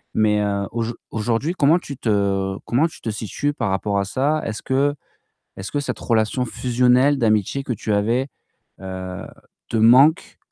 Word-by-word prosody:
mais, 105 -1 +3
heu, 100 -1 -1
auj 115 0 -2 0.2
aujourd'hui, 115 +9 -1
comment 150 +4 +4
tu 140 -6 -8
te 100 -3 0
comment 140 +8 +2
tu - - -14
te 110 - -4
situes 115 +7 -3
par 115 -7 -2
rapport 100 +1 0
à 100 - -1
ça? 145 +8 0
Est-ce 110 -2 -5
que 140 +2 +1 0.6
est-ce 95 - -7
que 145 - -1
cette - - -4
relation 115 +2 0
fusionnelle 125 +4 +2
d'amitié 110 +4 +1
que 125 - -2
tu 110 0 -3
avais, 115 +6 +1 0.5
heu, 95 -1 -6 0.4
te 115 - -1
manque, 130 +8 +5
115 Hz, 165 wpm, -21 LUFS, 105-135 Hz, 0.6 s, manque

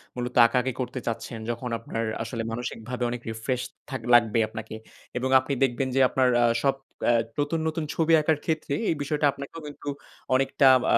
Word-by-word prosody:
মূলত 125 0 -4
আঁকাআঁকি 125 +1 0
করতে 130 +1 -4
চাচ্ছেন, 115 0 -4
যখন 125 +1 -5
আপনার 115 0 -4 0.2
আসলে 115 -1 -4
মানসিকভাবে 120 +1 -4
অনেক 120 0 -4
রিফ্রেশ 120 +3 -2 0.3
থাক 130 -2 -4
লাগবে 115 -1 +5
আপনাকে। 110 0 -7 0.4
এবং 130 +1 -1
আপনি 130 +2 -3
দেখবেন 130 0 +1
যে 135 - +3
আপনার 130 -1 +3
আ - - +5 0.2
সব 135 -1 +3 0.3
এ্যা 120 - +5 0.2
নতুন, 145 +3 0
নতুন 160 0 -2
ছবি 165 0 +3
আঁকার 155 0 +2
ক্ষেত্রে 155 -3 -1 0.2
এই - - +2
বিষয়টা 150 +1 0
আপনাকেও 140 +4 -9
কিন্তু 145 0 -7 0.5
অনেকটা 135 +1 +3 0.3
আ - - +7
130 Hz, 175 wpm, -26 LUFS, 120-140 Hz, 0.5 s, আ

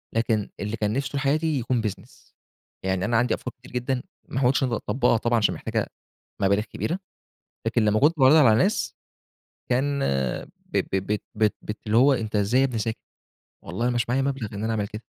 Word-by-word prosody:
لكن 110 -2 +1
اللي 105 +2 -3
كان 105 0 0
نفسي 135 +2 -1
طول 140 - -1
حياتي 150 +2 +1
يكون 120 0 0
business. 105 - -7 0.5
يعني 95 0 0
أنا 115 +1 +2
عندي 120 0 +2
أفكار 125 - -4
كتير 125 - -15
جدًا 125 +1 -1 0.3
ما 130 - -2
حاولتش 135 +1 +3
إن - - +2
أنا 115 - 0
أطبقها 125 -2 +1
طبعًا 120 +1 +1
عشان 105 -3 +2
محتاجة - - -2 0.5
مبالغ 100 +2 +3
كبيرة، 170 - -3 0.7
لكن 115 0 +2
لمّا 105 0 +3
كنت 155 +3 +4
باعرضها 135 +4 +7
على 115 -5 +6
الناس 190 - +1 0.7
كان، 140 +3 +1 0.7
ب - - -3 0.2
ب 95 +2 0 0.2
بت 105 -1 +2
بت 105 0 -5
اللي 110 +2 +3
هو 135 +3 +6
أنت 110 -3 -3
إزاي 105 +6 +3
يا - - +5
ابني 125 -4 -2
ساكت؟ 110 0 -2 0.6
والله 100 +9 -1
مش 120 -2 0
معايا 130 +3 +2
مبلغ 135 -6 -2
إن 100 +1 -4
أنا 115 - 0
أعمل 105 -2 -1
كده. 105 +3 -8
120 Hz, 200 wpm, -25 LUFS, 105-135 Hz, 0.7 s, باعرضها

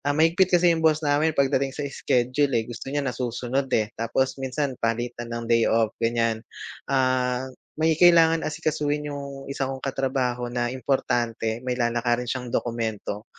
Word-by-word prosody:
ah, 145 +1 0
mahigpit 175 +3 +4
kasi 175 0 +4
yung 165 - -1
boss 155 -1 +2
namin 150 +2 +2
pagdating 135 0 +1
sa 145 - -3
schedule, 130 0 +1
eh, 115 - +1
gusto 120 +3 -8
niya 145 +1 -1
nasusunod, 125 +1 -2
eh, 110 0 -1
tapos 125 +4 -1
minsan 135 +1 -2
palitan 120 +1 -2
ng 115 0 -4
day 115 0 +3
off 110 -1 +2
ganiyan. 115 -1 +1 0.5
Ah, 130 -1 +1 0.4
may 160 0 +3
kailangan 165 -1 +5
asikasuhin 150 -1 -1
yung 140 -1 -7
1 140 0 -2
kong 135 0 -5
katrabaho 130 -2 -1
na 120 0 0
importante 120 -3 -1
may 125 - -1
lalakarin 120 +1 0
siyang 125 -1 -4
dokumento, 110 -3 -3
130 Hz, 155 wpm, -25 LUFS, 120-145 Hz, 0.5 s, kailangan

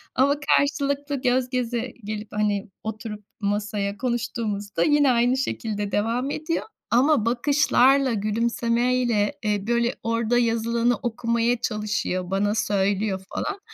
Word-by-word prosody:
ama 275 +3 +4
karşılıklı, 285 -1 +1
göz 255 0 +1
göze 245 -1 -2
gelip, 210 +1 -5
hani, 205 -1 0
oturup 215 -1 -6 0.2
masaya 205 -1 -2
konuştuğumuzda 225 -4 -2
yine 295 -3 +4
aynı 245 +2 +2
şekilde 210 -6 -3
devam 235 +6 0
ediyor 315 +2 -2 0.3
ama 255 0 +4
bakışlarla, 265 +1 +3
gülümsemeyle, 230 +1 +1
eee, 210 -1 -1
böyle 235 +1 +1
orada 230 +1 +1
yazılanı 235 0 +1
okumaya 235 0 0
çalışıyor, 210 -4 -2
bana 205 +2 +1
söylüyor, 200 -1 0
falan. 405 -1 -2
230 Hz, 115 wpm, -24 LUFS, 210-250 Hz, 0.3 s, ama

